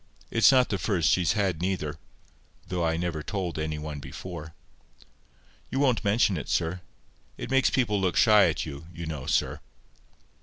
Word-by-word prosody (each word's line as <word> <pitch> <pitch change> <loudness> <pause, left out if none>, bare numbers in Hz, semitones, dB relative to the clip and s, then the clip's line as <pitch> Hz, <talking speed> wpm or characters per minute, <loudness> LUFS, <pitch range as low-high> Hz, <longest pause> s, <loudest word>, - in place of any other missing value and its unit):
It's 115 0 +6
not 130 -2 +4
the 100 - -1
first 90 -7 +1
she's 90 -3 +2
had 95 -6 0
neither, 85 -4 -2 0.7
though 90 -1 -2
I 80 0 +1
never 85 -2 -2
told 90 -2 -3
any 80 0 -2
one 75 -1 -6
before. 80 +1 -8 1.1
You - - -3
won't 130 -5 +2
mention 100 -2 +2
it, 75 - -6
sir. 85 +2 -1 0.6
It 120 - -6
makes 135 -1 +4
people 105 -6 +1
look 90 -2 0
shy 105 -3 +6
at - - -2
you, 75 +1 -8
you 85 0 -7
know, 75 -5 -5
sir." - - 0
90 Hz, 165 wpm, -27 LUFS, 80-105 Hz, 1.1 s, It's